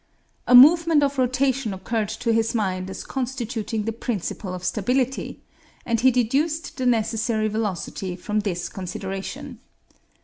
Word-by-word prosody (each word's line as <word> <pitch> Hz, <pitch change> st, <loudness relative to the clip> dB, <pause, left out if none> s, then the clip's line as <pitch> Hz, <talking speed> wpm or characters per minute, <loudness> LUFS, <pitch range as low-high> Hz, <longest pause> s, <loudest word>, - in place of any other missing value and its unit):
A 250 Hz, -, +6 dB
movement 320 Hz, +3 st, +7 dB
of 280 Hz, -1 st, 0 dB
rotation 255 Hz, -3 st, +1 dB
occurred 215 Hz, +2 st, -2 dB
to 225 Hz, +2 st, -1 dB
his 225 Hz, +1 st, +1 dB
mind 190 Hz, -4 st, -1 dB
as 190 Hz, -, -6 dB
constituting 240 Hz, -4 st, -3 dB
the 225 Hz, -, -2 dB
principle 215 Hz, -4 st, -4 dB
of 180 Hz, -, -8 dB
stability, 250 Hz, +7 st, -1 dB, 0.4 s
and 230 Hz, -1 st, 0 dB
he 260 Hz, +3 st, +5 dB
deduced 275 Hz, +7 st, 0 dB
the 255 Hz, -2 st, 0 dB
necessary 225 Hz, -1 st, +1 dB
velocity 200 Hz, -3 st, -3 dB
from 210 Hz, +4 st, -2 dB
this 180 Hz, -4 st, -2 dB
consideration. 190 Hz, +1 st, -6 dB
225 Hz, 135 wpm, -23 LUFS, 205-255 Hz, 0.4 s, movement